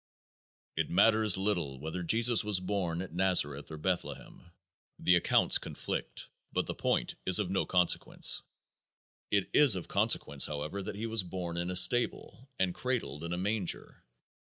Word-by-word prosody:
It - - -2
matters 110 +1 +4
little 85 -9 -2
whether 80 +5 -5
Jesus 115 +6 +3
was 105 -3 +2
born 90 -2 -3
at 90 - -11
Nazareth 85 -6 +2
or 80 - -8
Bethlehem. 90 +1 -5 0.5
The 90 - +3
accounts 85 - +3
conflict, - - -5 0.2
but - - -1
the - - -4
point - - -1
is 95 - +4
of 100 -4 -1
no 95 - -1
consequence. 90 -2 +2 0.9
It 100 -2 0
is 140 -8 +6
of 90 - -6
consequence, 70 -1 +1
however, 75 +6 -5
that 95 - -6
He 110 +3 -5
was 115 -1 +1
born 90 -1 -6
in 85 +1 -3
a 90 - -4
stable 120 +6 +2
and 95 -2 0
cradled 115 - -3
in 85 - -5
a 90 - -2
manger. 100 0 -4
90 Hz, 155 wpm, -30 LUFS, 85-105 Hz, 0.9 s, is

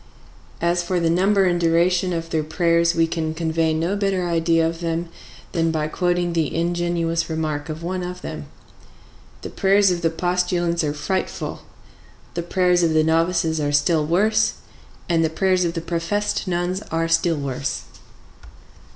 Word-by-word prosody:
As 170 +1 +2
for 175 +1 -1
the 165 -1 +1
number 195 +3 +3
and 175 -1 +1
duration 175 +2 +2
of 165 -1 -4
their 160 - +1
prayers 170 +1 +2
we 165 0 +3
can 160 -1 -3
convey 160 0 0
no 165 +5 0
better 195 -3 0
idea 165 -1 +2
of 165 0 -4
them 165 0 -2 0.4
than 165 -1 +1
by 155 -1 -1
quoting 175 +1 0
the 160 -3 -1
ingenuous 170 0 -1
remark 155 -2 -3
of 155 +1 -6
one 185 +2 -2
of 180 0 -6
them: - - -6 1.0
"The - - -6
prayers 195 -1 +3
of 175 -1 -2
the 165 - +2
postulants 175 0 0
are 150 -1 -1
frightful, 190 +5 -3 0.7
the 170 - -2
prayers 180 0 +2
of 165 -2 +2
the 155 - +4
novices 165 0 +1
are 145 0 0
still 155 +2 +2
worse, 215 +7 +2 0.5
and 165 -2 +2
the 160 - +1
prayers 185 +2 +1
of 170 0 -2
the 165 - -2
professed 170 +6 -2
nuns 180 +2 -1
are 165 +1 0
still 165 0 +2
worse." 140 -1 -3
170 Hz, 165 wpm, -22 LUFS, 165-180 Hz, 1.0 s, the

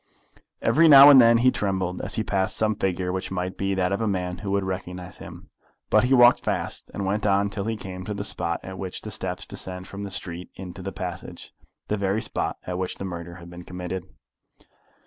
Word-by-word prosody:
Every 165 +2 +5
now 140 -1 +11
and 135 -2 +9
then 115 0 +6
he 130 - +7
trembled 95 -4 -2
as - - -2
he 110 - 0
passed 95 -2 -1
some 110 0 +2
figure 95 -3 -1
which 95 +1 -3
might 90 0 -3
be 95 0 -1
that 90 -1 0
of 100 - -1
a 110 - 0
man 90 -2 -2
who 100 -2 -4
would 100 0 +1
recognise 90 -1 -6
him. - - -11 0.4
But 110 +2 +5
he 130 - +2
walked 120 0 +7
fast, - - -2
and 100 - -3
went 105 +2 0
on 100 0 +2
till 100 0 -4
he 110 0 -2
came 95 -2 -7
to 105 - -4
the 100 - -4
spot 85 -4 -3
at 95 0 -8
which 95 -2 -5
the 110 - -6
steps 90 -2 -4
descend 90 0 -6
from 100 - -8
the 100 - -5
street 90 -2 -5
into 95 0 -8
the 95 +1 -5
passage, 90 -2 -7 0.3
the 105 - -1
very 100 +2 0
spot - - -2
at 90 0 -3
which 90 -1 -3
the 95 - -6
murder 85 -1 -6
had 85 -1 -12
been 90 0 -9
committed. 90 0 -5
95 Hz, 225 wpm, -25 LUFS, 90-105 Hz, 0.4 s, now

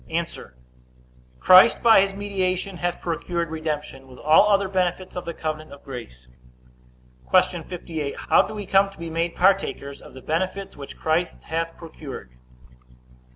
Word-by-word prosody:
A. 165 +1 0 1.1
Christ, 185 +5 +7
by 225 -4 +7
his 195 0 -1
mediation, 195 -2 -2
hath 175 0 -2
procured 170 0 -3
redemption, 150 -4 -4
with 130 -1 -14
all 155 +9 +5
other 200 -1 +3
benefits 185 -1 -1
of 180 - -5
the 170 - -4
covenant 155 0 -5
of 140 - -13
grace. 90 - -9 1.0
Q. - - +3
58. 160 -5 -5
How - - +4
do 215 - -5
we 205 -1 -5
come 195 +1 +3
to 195 - -17
be 165 0 -6
made 165 +1 -1
partakers 180 -7 +1
of - - -14
the 130 - -10
benefits 185 +4 -2
which 140 -1 -10
Christ 160 +3 -1
hath 165 +1 -3
procured? 150 - -9
170 Hz, 155 wpm, -24 LUFS, 155-190 Hz, 1.1 s, Christ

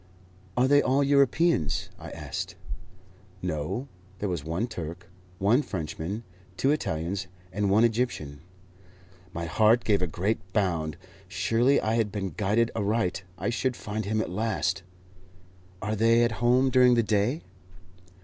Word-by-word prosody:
"Are 125 +1 +4
they 145 +1 +6
all 135 +2 +2
Europeans?" 140 - +2
I - - -8
asked. - - -5 0.9
"No. 90 - -2 0.3
There 100 +1 -2
was 85 -5 -2
one 85 +8 -1
Turk, 85 -5 -7 0.3
one 105 +9 +3
Frenchman, 90 - -4 0.3
two 135 - +2
Italians, 95 - -2 0.3
and 100 0 0
one 105 +4 +5
Egyptian." 110 - 0 0.9
My 85 -1 -4
heart 110 +8 +4
gave 100 -3 +2
a 90 - +1
great 95 +7 -1
bound. 85 -7 0 0.3
Surely 115 +9 +2
I 110 - 0
had 115 -3 +1
been 95 -3 -3
guided 105 +7 +1
aright; 100 -3 0 0.2
I 120 - -1
should 125 +1 0
find 110 -1 -4
him 110 +2 0
at 90 - -4
last. 95 -3 -1 1.0
"Are 105 +2 -1
they 115 +2 +4
at 120 - +2
home 125 +2 +4
during 125 -1 +6
the 115 - +3
day?" 110 +8 +1
105 Hz, 140 wpm, -27 LUFS, 90-120 Hz, 1.0 s, they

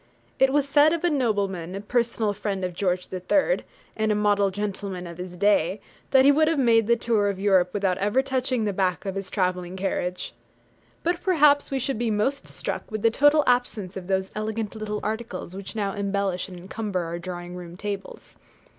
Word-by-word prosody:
It 265 0 +5
was 285 0 +2
said 290 +3 +5
of 335 - -2
a 350 - +3
nobleman, 200 - -1
a - - -3
personal 230 -1 0
friend 195 -2 -3
of 180 - -4
George 180 0 -1
III. 285 - +2 0.4
and 220 0 +1
a - - +2
model 205 -1 +3
gentleman 195 -2 -4
of 170 0 -9
his 180 0 -7
day, 200 -1 +2 0.3
that 265 -1 +5
he 285 - +8
would 310 +2 +3
have 325 -1 +2
made 230 -4 +4
the 235 - +5
tour 225 -3 +1
of 200 - -3
Europe 190 -3 +3
without 195 -2 0
ever 210 +7 +2
touching 255 -3 0
the 205 - 0
back 185 -1 0
of 195 - -2
his 195 0 -5
travelling 180 -2 -1
carriage. 180 -1 -2 0.7
But 345 +1 0
perhaps 300 -6 +4
we 275 - -1
should 265 -2 -2
be 235 -1 0
most 240 +7 0
struck - - -5
with 215 -1 -4
the 230 - +5
total 290 +5 +5
absence 220 -6 0
of 185 -2 -7
those 190 0 0
elegant 215 0 -3
little 215 -1 -4
articles 215 -4 -4
which 195 +2 -7
now 200 -3 -1
embellish 200 -2 -1
and 180 - -9
encumber 195 +1 -3
our 170 0 -4
drawing 175 0 -7
room 175 -1 -9
tables. 200 0 -6
205 Hz, 200 wpm, -25 LUFS, 185-235 Hz, 0.7 s, he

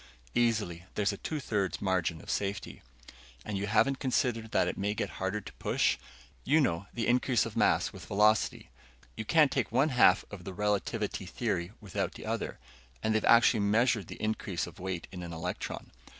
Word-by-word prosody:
"Easily. 105 -8 +1
There's 105 -1 +1
a - - -6
two 155 +8 -4
thirds 100 -8 -1
margin 90 -4 0
of - - -6
safety." 100 -1 -3 0.6
"And 105 - -3
you 100 +1 -2
haven't 130 +6 +3
considered 120 -3 0
that - - +2
it - - -2
may 100 +2 -1
get - - -2
harder 95 +3 -1
to - - -11
push? - - +1 0.4
You 150 +4 +4
know 100 - 0
the 115 -2 -2
increase 125 -1 +3
of - - -7
mass - - +2
with - - -10
velocity. 105 +2 +2 0.4
You 110 - -5
can't 155 +2 +5
take 130 -5 -1
one 135 +6 +3
half 120 -7 +5
of 100 -3 -8
the 95 +1 -7
relativity 105 -1 -1
theory 95 -4 -2
without 95 -2 -3
the - - -9
other. 115 0 -3 0.5
And 110 - +2
they've 110 - +1
actually 115 -1 +6
measured 110 0 +2
the - - -9
increase 105 -6 -2
of 85 0 -12
weight 90 -2 -4
in 90 -2 -7
an 85 -1 -6
electron." 85 +3 -5
105 Hz, 185 wpm, -30 LUFS, 95-115 Hz, 0.6 s, actually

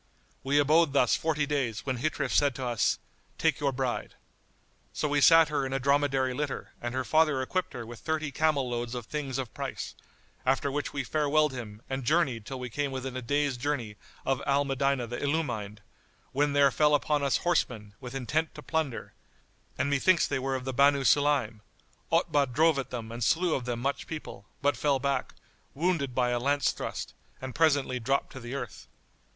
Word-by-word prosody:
We 140 +2 +1
abode 150 +1 +4
thus 125 -4 +4
forty 155 -2 0
days 135 -7 -2
when 130 -2 -1
Ghitrif 155 +5 -1
said 145 -3 +3
to 130 - -4
us, 120 -2 +1 0.4
"Take - - +1
your 140 -2 +1
bride." 130 -2 -3 0.8
So - - -1
we 145 0 +1
sat 165 +1 +7
her 150 -2 0
in 135 0 -3
a 135 - 0
dromedary 135 -1 +2
litter 145 +1 -4
and 120 +1 -3
her 130 - 0
father 155 0 +3
equipped 180 +8 -2
her 115 - -6
with 120 0 -9
thirty 155 -2 -2
camel 145 -2 +1
loads 120 0 -3
of 120 -2 -5
things 140 -1 -3
of 130 -4 -4
price; - - -5 0.5
after 135 +2 +1
which 145 +1 -2
we 140 - -2
farewelled 150 +2 +2
him 115 -4 -8
and 135 0 -3
journeyed 130 -7 +1
till 135 -1 -5
we 125 - -4
came 145 +4 -2
within 130 -1 -4
a 130 - -3
day's 145 +1 0
journey 120 -5 -2 0.3
of 135 0 0
Al 140 +1 +3
Medinah 135 -2 0
the 120 +1 -5
Illumined, 120 -9 -2 0.5
when 145 +1 +1
there 140 -1 +5
fell 150 +4 +4
upon 145 0 +1
us 140 -1 +2
horsemen, 120 -12 -1
with 125 0 -8
intent 150 +5 -1
to - - -9
plunder, 145 -9 -2 0.6
and 130 - +1
methinks 165 +5 +4
they - - -1
were 135 +1 -1
of 130 -1 -4
the 130 - -2
Banu 140 +1 +4
Sulaym, 140 -6 +2 0.5
Otbah 145 -1 +3
drove 155 +2 +3
at 135 - -4
them 115 -2 -6
and 120 +1 -4
slew 170 +8 +2
of 125 - -2
them 120 -1 -2
much 140 +3 -2
people, 150 -11 -7 0.2
but 145 0 +3
fell 145 -2 +2
back, 140 +1 -2 0.4
wounded 150 -5 0
by 125 -1 +2
a 120 - +1
lance 140 +3 +2
thrust, - - -5 0.3
and 130 -1 -6
presently 145 -5 +2
dropped 135 +4 0
to 130 - -8
the 120 +2 -6
earth. 140 - -6
135 Hz, 195 wpm, -29 LUFS, 125-145 Hz, 0.8 s, sat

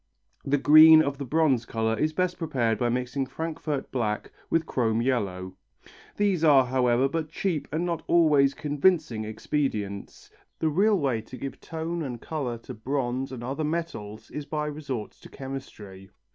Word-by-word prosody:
The 145 +1 +1
green 155 +2 +8
of 140 -1 -3
the 140 - -4
bronze 145 -4 +2
colour 110 -1 -1
is 155 +8 0
best 180 +2 -1
prepared 125 - 0
by 120 - +1
mixing 125 +2 -2
Frankfort 155 0 -4
black 110 -4 -2 0.2
with 165 -1 +1
chrome 115 -3 0
yellow. 95 -8 -2 0.6
These 200 -5 +1
are, 140 -4 +6
however, 125 0 +2
but 155 +2 -3
cheap 165 -2 -2
and 160 +4 -1
not 170 -2 -2
always 150 -5 +4
convincing 145 -6 +1
expedients, 110 -3 -3 0.3
the 160 - 0
real 200 +7 +3
way 135 -8 0
to 120 +4 -11
give 135 - -7
tone 165 +1 -4
and 125 -6 -5
colour 135 -6 -4
to - - -8
bronze 130 +2 -2
and 125 -2 -7
other 135 +5 -3
metals 150 -10 -4
is 150 -1 -6
by 150 -1 -2
resort 145 -7 -5
to - - -16
chemistry. 110 -8 -9
135 Hz, 160 wpm, -26 LUFS, 120-155 Hz, 0.6 s, green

